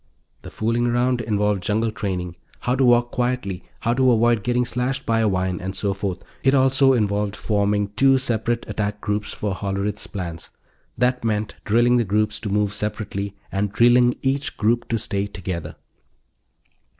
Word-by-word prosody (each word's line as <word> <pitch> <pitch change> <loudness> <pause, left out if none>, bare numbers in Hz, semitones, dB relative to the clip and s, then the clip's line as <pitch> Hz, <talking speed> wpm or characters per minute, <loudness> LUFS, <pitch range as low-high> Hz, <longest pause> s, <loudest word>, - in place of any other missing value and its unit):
The - - -9
"fooling 115 +2 0
around" 120 +1 +1
involved 105 -3 0
jungle 110 +3 0
training 90 -5 -4 0.3
how 125 - 0
to 135 - +2
walk 120 -1 +4
quietly, 120 -7 -2 0.2
how 115 - +1
to 130 0 +4
avoid 120 -1 +3
getting 125 +2 +1
slashed 125 +3 -2
by 115 0 +2
a 110 - +3
vine, 95 -1 -1
and 95 +1 -4
so 100 0 0
forth. 95 -2 -4 0.2
It 135 +1 +3
also 135 0 +4
involved 105 -3 0
forming 105 -1 0
two 135 +6 +4
separate 120 -2 -1
attack 105 -1 -2
groups 105 0 -2
for 105 -2 -3
Hollerith's 100 +1 -3
plans. 85 -4 -6 0.5
That 125 +1 +1
meant 105 -2 -1
drilling 120 +3 +4
the 120 - +3
groups 105 +1 0
to 110 - -4
move 105 0 +1
separately, 105 -1 -3 0.2
and 100 0 -1
drilling 120 +3 +4
each 135 0 -1
group 120 +2 +1
to 115 - 0
stay 100 -2 -2
together. 95 -4 -5
110 Hz, 165 wpm, -22 LUFS, 100-120 Hz, 0.5 s, walk